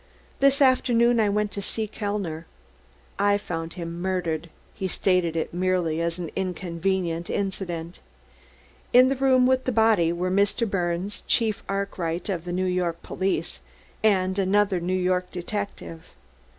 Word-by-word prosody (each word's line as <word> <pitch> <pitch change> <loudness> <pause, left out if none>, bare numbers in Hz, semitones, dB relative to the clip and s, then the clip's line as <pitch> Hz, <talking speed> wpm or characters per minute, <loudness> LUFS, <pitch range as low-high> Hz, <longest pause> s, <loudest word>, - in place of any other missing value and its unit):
This 275 +1 +4
afternoon 240 -2 +4
I 215 -2 +3
went 210 0 0
to 200 - -5
see 220 +2 -2
Mr. - - -26
Kellner. 200 -7 -3 0.7
I 205 0 +4
found 165 -4 -5
him 170 -1 -6
murdered." 170 -3 -2 0.2
He 190 - -3
stated 180 -3 +1
it 160 - -2
merely 175 -3 0
as 170 0 -1
an 175 -3 -5
inconvenient 180 -2 -2
incident. 180 -4 -3 0.9
"In 255 +1 +7
the 270 - +1
room 260 -1 +4
with 260 0 +2
the 255 - +1
body 220 -7 +3
were 180 +2 -1
Mr. 200 +4 +2
Birnes, 180 0 -2
Chief 220 -3 +1
Arkwright 190 -3 -2
of 175 -3 -2
the 175 - -4
New 185 +1 0
York 180 -2 -1
police, 185 - -2 0.4
and 190 -2 +2
another 195 -1 +2
New 180 +2 -1
York 180 0 0
detective. 185 -3 -5
185 Hz, 150 wpm, -25 LUFS, 170-205 Hz, 0.9 s, In